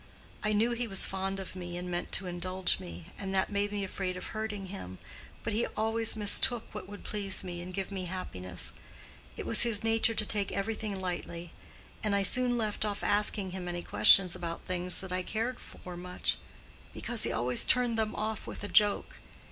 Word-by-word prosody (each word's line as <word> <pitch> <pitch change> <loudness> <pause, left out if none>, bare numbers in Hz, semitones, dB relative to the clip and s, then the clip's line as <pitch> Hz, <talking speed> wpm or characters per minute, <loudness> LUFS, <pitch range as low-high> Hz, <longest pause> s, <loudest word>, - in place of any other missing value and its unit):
I 210 - +1
knew 215 +3 +3
he 240 0 -2
was 195 -3 +3
fond 195 0 -3
of 190 -1 -7
me 175 -1 -6
and 180 0 -5
meant 175 0 -3
to 195 - +4
indulge 180 - +1
me, 85 -2 -9
and 195 -1 -3
that 190 - +1
made 205 0 0
me 205 -1 -2
afraid 185 -1 -3
of - - -6
hurting 215 -2 -3
him; 135 - -7 0.5
but 225 - -2
he 225 +3 +1
always 225 +1 +2
mistook 220 +3 +4
what 205 -2 -7
would 205 - -9
please 200 -3 0
me 175 -2 -5
and 180 +1 -7
give 195 +1 -4
me 190 -2 -3
happiness. 90 - -3 0.6
It - - -5
was - - +5
his 230 -4 +2
nature 225 0 +4
to 215 - 0
take 205 -2 +1
everything 210 -1 -2
lightly; 175 -2 -4 0.5
and 210 -2 +2
I 200 - +2
soon 245 +4 +4
left 215 -3 -1
off 205 -1 -2
asking 205 -2 +1
him 180 -1 -5
any 175 0 -4
questions 180 -3 +6
about 170 -2 -5
things 180 -1 +2
that 190 -1 -7
I 185 0 0
cared 225 +6 -2
for 180 -1 -10
much, 180 +1 -2 0.6
because 235 -2 -1
he - - 0
always 120 +1 +2
turned 245 -2 +3
them 220 -1 0
off 215 0 -3
with - - -6
a - - -2
joke. 205 0 +3
195 Hz, 200 wpm, -31 LUFS, 180-215 Hz, 0.6 s, questions